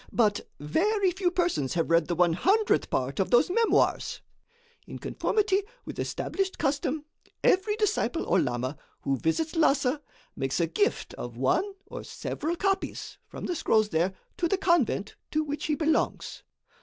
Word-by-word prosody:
But 210 -3 +1
very 380 - +1
few 365 0 0
persons 350 - 0
have 165 -1 0
read 170 -1 +4
the 175 - -1
one 175 -1 +4
hundredth 405 - +2
part 130 +2 -1
of 190 - +1
those 245 +8 +4
memoirs. 460 +3 +2 0.7
In - - -7
conformity 415 -2 +1 0.2
with - - -7
established 385 -1 -2
custom, 290 +1 -1 0.4
every 405 +3 +3
disciple 420 -5 0
or - - +3
lama 130 0 -2 0.2
who 135 -1 0
visits 300 - 0
Lhassa 285 -3 +2 0.3
makes 135 +3 -1
a 170 - +3
gift 410 - 0
of - - -6
one 400 +1 +1
or - - -8
several 320 +3 -3
copies, 385 +2 -2
from - - -7
the - - -1
scrolls 215 -8 +2
there, 175 +3 0 0.2
to 345 - +1
the 390 - +1
convent 315 - +1
to 310 0 0
which 295 0 -4
he 305 - +1
belongs. 310 0 0
300 Hz, 155 wpm, -28 LUFS, -, 0.7 s, read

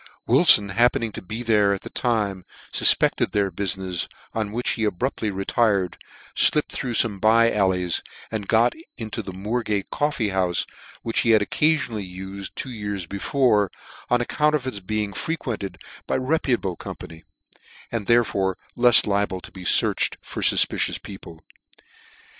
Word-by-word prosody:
Wilfon 100 -1 +7
happening 115 +1 +2
to - - -8
be 110 +6 -6
there 105 -3 +3
at 95 - -9
the - - -9
time, 105 -6 -1 0.3
fufpected - - +4
their 100 -2 +1
buiinefs, 95 -1 -2 0.3
on' 110 -2 -2
wjhich 120 +2 -2
lie 110 - +1
abruptly 110 +2 -2
retired, 95 -1 0 0.4
flipped 150 - +4
through 125 -3 -3
fome 105 -5 +1
bye 115 +2 +4
allies, 95 -3 +1 0.3
and 105 -3 -4
got 115 +2 +3 0.2
into 110 -2 -5
the 95 - -8
Moorgate 105 +1 -3
corFee 140 -8 -1
houfe, 90 -2 0 0.4
which 115 - -1
he 115 - +1
had 110 -2 +5
occafionally 120 - 0
uled 95 +1 -6
for - - -21
two 130 - -5
years 105 -5 -4
before, 105 +2 +1 0.4
on 120 0 +2
account 150 +5 +1
of 140 -4 -3
its 130 -6 -4
being 105 +1 -3
frequented 115 -7 -4 0.3
by - - -1
reputable 130 - 0
company, 80 -1 -10 0.7
and 115 -4 -4
therefore 100 -6 +2 0.2
lefs 120 -1 +5
liable 100 -2 -1
to - - -12
be 95 - -11
fearched - - +2
for - - -7
fufpicious - - +2
people. 85 -5 -12
105 Hz, 150 wpm, -23 LUFS, 95-120 Hz, 0.7 s, Wilfon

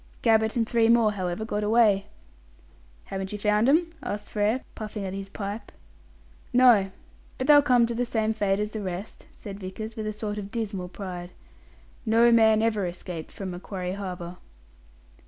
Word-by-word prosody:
Gabbett 220 -1 +3
and 225 -1 +1
three 230 -1 +3
more, 230 -2 +5
however, 185 +1 -3
got 210 -1 -2
away." 210 -2 +3 1.0
"Haven't 190 0 -5
you 210 - -4
found 210 +3 +2
'em?" 330 +3 +3
asked 205 -6 -5
Frere, 215 +4 +1
puffing 215 -2 -6
at 190 - -4
his 195 0 -6
pipe. 205 +2 -6 0.8
"No. 245 -6 +5 0.5
But 260 - -2
they'll 290 0 +8
come 250 -4 +4
to 235 - -3
the 240 +1 0
same 220 -2 0
fate 200 -2 0
as 210 0 -2
the 215 - -4
rest," 190 +2 -6
said 200 -2 -9
Vickers, 215 +4 -6
with 215 -2 -4
a - - -1
sort 210 0 -4
of 200 0 -7
dismal 205 -6 -3
pride. 180 -2 -7 0.7
"No 230 +1 +4
man 220 -1 +5
ever 215 -4 +1
escaped 175 -2 -7
from 190 -2 -6
Macquarie 180 0 -5
Harbour." 180 -3 -6
210 Hz, 170 wpm, -26 LUFS, 195-225 Hz, 1.0 s, they'll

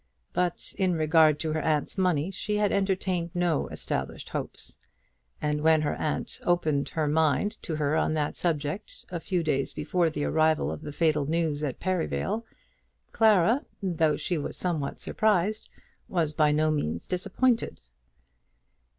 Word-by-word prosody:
But 180 -1 -1
in 185 -2 +2
regard 155 -1 +4
to 155 -1 -1
her 155 - 0
aunt's 150 -2 0
money 180 -3 +1
she 210 +2 -2
had 210 -1 +2
entertained 185 -3 0
no 175 -3 +1
established - - -4
hopes; - - -5 0.6
and 150 0 -1
when 160 0 +4
her 150 - 0
aunt 155 - -3
opened 155 -5 +1
her 155 -2 -1
mind 160 +6 +1
to 160 - -3
her 150 0 0
on 160 0 +1
that 150 -1 -1
subject, 165 +4 -2
a 175 - -3
few 175 0 -1
days 140 -3 0
before 175 -2 +1
the 150 -2 -3
arrival 155 0 +2
of - - -6
the 150 -1 -6
fatal 150 -2 +1
news 160 -2 0
at 140 -4 -3
Perivale, 185 - -1 0.7
Clara, 220 - +4 0.2
though 160 -5 +2
she 175 -4 -1
was 145 - -4
somewhat 160 -6 -2
surprised, 215 0 +1 0.4
was 165 -4 0
by 150 0 +3
no 155 +1 +2
means 85 - -2
disappointed. 230 - 0
160 Hz, 150 wpm, -27 LUFS, 150-180 Hz, 0.7 s, regard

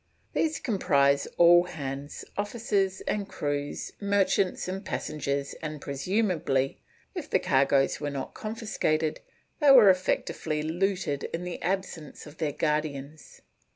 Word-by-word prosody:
These 320 0 +1
comprise 140 - +2
all 175 +1 +7
hands, 140 -4 -6
officers 205 -2 -1
and 205 -1 -2
crews, 145 0 -3
merchants 200 -2 +1
and 190 +2 -4
passengers, 140 -6 -3
and 155 -1 -5
presumably, 140 -3 0 0.3
if - - -6
the - - +4
cargoes 135 +1 +2
were 145 - -1
not 140 -2 -5
confiscated, 215 -9 -1 0.4
they 295 -3 +5
were 240 -8 +9
effectually 160 -4 -1
looted 175 -3 -1
in 165 +2 -4
the 180 -1 -5
absence 180 -4 -3
of 150 +1 -13
their 155 -3 0
guardians. 150 -1 -3
160 Hz, 120 wpm, -28 LUFS, 145-195 Hz, 0.4 s, were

